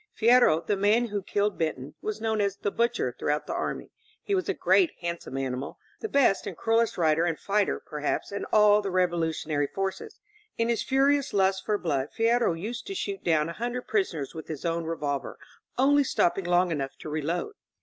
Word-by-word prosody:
Fierro, 235 -8 +5
the 205 - +1
man 215 +4 +2
who 205 -1 -2
killed 205 +2 -1
Benton, 150 -3 -2
was 215 0 -3
known 220 -1 0
as 200 -1 0
"The 205 - -2
Butcher" 230 - 0
throughout 150 +1 -1
the - - -4
army. - - -4 0.3
He 405 - -2
was 375 -1 0
a - - 0
great 365 -4 +4
handsome 170 -5 -4
animal, 135 0 -4 0.2
the 440 - -4
best 245 - +3
and 185 -5 -6
cruellest 225 0 +1
rider 160 -1 +3
and 170 -3 0
fighter, 205 0 0
perhaps, 150 +4 -3
in 200 - -4
all 210 -1 +5
the 200 - -3
revolutionary 165 -5 0
forces. 195 - -4 0.4
In 230 0 +1
his 235 - +1
furious 275 +1 +2
lust 190 -1 +2
for 210 - +2
blood 145 -7 -1
Fierro 230 -3 +3
used 235 +6 -5
to 390 - -5
shoot 200 - -4
down 160 -2 +2
a 170 - -5
hundred 245 +5 -3
prisoners 165 - -1
with 160 - -8
his 155 -1 -6
own 170 0 -1
revolver, 145 -5 -3 0.4
only 285 +3 +4
stop 175 -9 +2
ping 190 0 -5
long 175 0 +2
enough 140 -4 -3
to - - -9
reload. 155 - -2
195 Hz, 195 wpm, -27 LUFS, 160-230 Hz, 0.4 s, Fierro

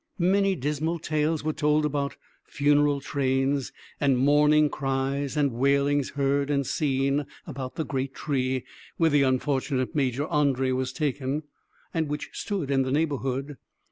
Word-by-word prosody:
Many 195 +2 +2
dismal 150 +3 -1
tales 155 -1 -1
were 155 0 -1
told 150 +1 +2
about 140 -1 -1 0.3
funeral 145 0 +2
trains, 135 -1 0 0.3
and 140 -3 +3
mourning 150 +3 +4
cries 135 0 -2
and 145 -2 +2
wailings 140 +3 +2
heard 140 0 +1
and 140 -1 +1
seen 140 +1 0 0.2
about 130 -4 -6
the 160 - -2
great 135 -1 -3
tree 130 -3 -1 0.3
where 165 -1 +3
the 145 0 +4
unfortunate 130 0 0
Major 140 -2 0
André 135 -5 +1
was 130 0 -1
taken, 145 0 -2 0.5
and 160 -2 0
which 150 0 -4
stood 185 -9 -3
in 135 -1 +3
the 130 - -1
neighborhood. 140 -2 -1
140 Hz, 140 wpm, -26 LUFS, 135-150 Hz, 0.5 s, mourning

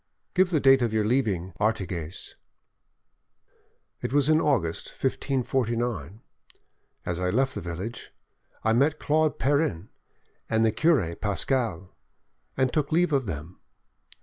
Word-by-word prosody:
"Give 185 -1 +3
the 165 -4 +2
date 135 -1 +5
of 120 -2 +1
your 110 -1 +1
leaving 105 -7 0
Artigues." 95 -6 -2 1.7
"It - - -3
was 145 +1 +3
in 155 +1 +4
August 105 - 0
1549. 120 - -1 0.8
As 90 0 -2
I 90 0 0
left 130 +7 +1
the - - -5
village, 90 +7 -6 0.5
I 110 - +3
met 140 +6 +3
Claude 155 0 +1
Perrin 140 - 0 0.6
and 110 0 +3
the 110 - +3
cure 110 - +2
Pascal, 100 -2 -1 0.6
and 130 -1 +1
took 150 -3 0
leave 170 0 +2
of 135 -3 +2
them. 80 +1 -6
115 Hz, 125 wpm, -26 LUFS, 95-140 Hz, 1.7 s, date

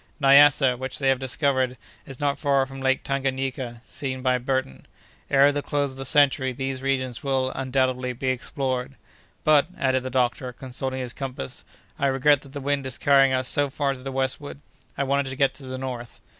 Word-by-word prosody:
Nyassa, 140 -2 +6
which 130 0 -4
they 135 -2 +1
have 135 -1 +2
discovered, 130 -1 0 0.3
is 135 -2 -8
not 145 -1 0
far 140 -3 +2
from 135 0 -9
Lake 130 0 +1
Tanganayika, 130 -3 -2
seen 130 -2 -4
by 125 -1 +2
Burton. 130 - -3 0.4
Ere 140 +1 +5
the 145 0 -2
close 145 -1 -1
of 130 - -11
the 135 - -4
century 140 -2 +3
these 135 +1 -4
regions 130 -3 -1
will, 130 -2 0
undoubtedly, 130 -1 0
be 130 +2 -3
explored. 130 0 -2 0.5
But," 150 -1 +5
added 130 -5 +1
the 130 - -5
doctor, 125 0 0
consulting 130 +1 -4
his 125 -2 -5
compass, 130 - -6 0.3
"I 140 - +2
regret 135 +1 +3
that 140 -1 -15
the 145 - -4
wind 140 -1 -1
is 130 - -6
carrying 135 -1 +5
us 130 -1 0
so 145 +2 +1
far 140 0 -1
to 130 - -10
the 135 +1 -6
westward. 135 +2 -2 0.4
I 140 - +1
wanted 140 0 0
to 130 - -5
get 135 0 +2
to 135 - -11
the 130 0 -5
north." 125 -3 -6
135 Hz, 195 wpm, -24 LUFS, 130-140 Hz, 0.5 s, Nyassa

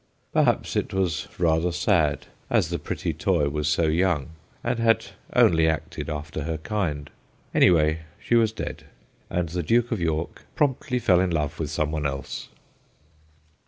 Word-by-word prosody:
Perhaps - - +2
it - - -1
was 90 -5 0
rather 85 0 +2
sad, 85 -5 +1 0.2
as - - +2
the - - -2
pretty - - -3
toy 70 -1 +1
was 75 0 -2
so 85 +3 +2
young, 80 -2 +1 0.3
and 120 0 -1
had 115 0 +3 0.3
only 80 -1 +5
acted 80 -1 -2
after 75 0 -4
her 80 -1 -2
kind. 80 -5 -3 0.4
Anyhow, 80 -3 +4 0.2
she - - -3
was 115 -2 +4
dead, 110 - -6 0.4
and 90 -2 -1
the 90 +2 -2
Duke 120 +8 +2
of 110 -6 -1
York 80 0 -2
promptly 140 -2 0
fell 100 -7 +4
in 95 0 +2
love 75 -3 -2
with 75 -3 -2
some 75 0 -1
one 75 -2 -1
else. 70 -1 -5
80 Hz, 160 wpm, -25 LUFS, 75-95 Hz, 0.4 s, only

